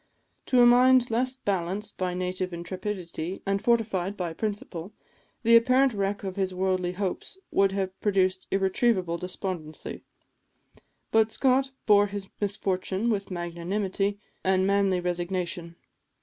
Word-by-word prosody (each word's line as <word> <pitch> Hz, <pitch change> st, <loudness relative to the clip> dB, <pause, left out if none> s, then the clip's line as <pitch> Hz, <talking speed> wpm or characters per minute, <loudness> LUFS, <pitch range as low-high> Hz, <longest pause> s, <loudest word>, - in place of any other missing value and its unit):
To 255 Hz, -, +3 dB
a -, -, +8 dB
mind 250 Hz, 0 st, +6 dB
less 255 Hz, +3 st, +1 dB
balanced 200 Hz, -2 st, -2 dB
by 180 Hz, -1 st, -1 dB
native 185 Hz, 0 st, -2 dB
intrepidity 175 Hz, 0 st, -5 dB
and 195 Hz, 0 st, 0 dB
fortified 210 Hz, -5 st, +1 dB
by 175 Hz, -3 st, -3 dB
principle, 200 Hz, -2 st, -4 dB, 0.5 s
the 230 Hz, 0 st, +6 dB
apparent 255 Hz, +2 st, +5 dB
wreck 200 Hz, 0 st, -2 dB
of 190 Hz, 0 st, -5 dB
his 190 Hz, -1 st, -1 dB
worldly 185 Hz, -1 st, 0 dB
hopes 195 Hz, -, -4 dB
would 195 Hz, 0 st, +3 dB
have 190 Hz, -1 st, -3 dB
produced 190 Hz, -2 st, +1 dB
irretrievable 190 Hz, -2 st, +1 dB
despondency; 180 Hz, -3 st, -5 dB, 1.1 s
but 220 Hz, 0 st, +4 dB
Scott 265 Hz, +2 st, +2 dB, 0.2 s
bore 205 Hz, -1 st, +5 dB
his 200 Hz, -1 st, -6 dB
misfortune 200 Hz, +1 st, -1 dB
with 200 Hz, -2 st, -2 dB
magnanimity 190 Hz, +3 st, -2 dB, 0.3 s
and 190 Hz, 0 st, +2 dB
manly 195 Hz, -2 st, +2 dB
resignation. 175 Hz, -1 st, -2 dB
195 Hz, 125 wpm, -27 LUFS, 180-210 Hz, 1.1 s, a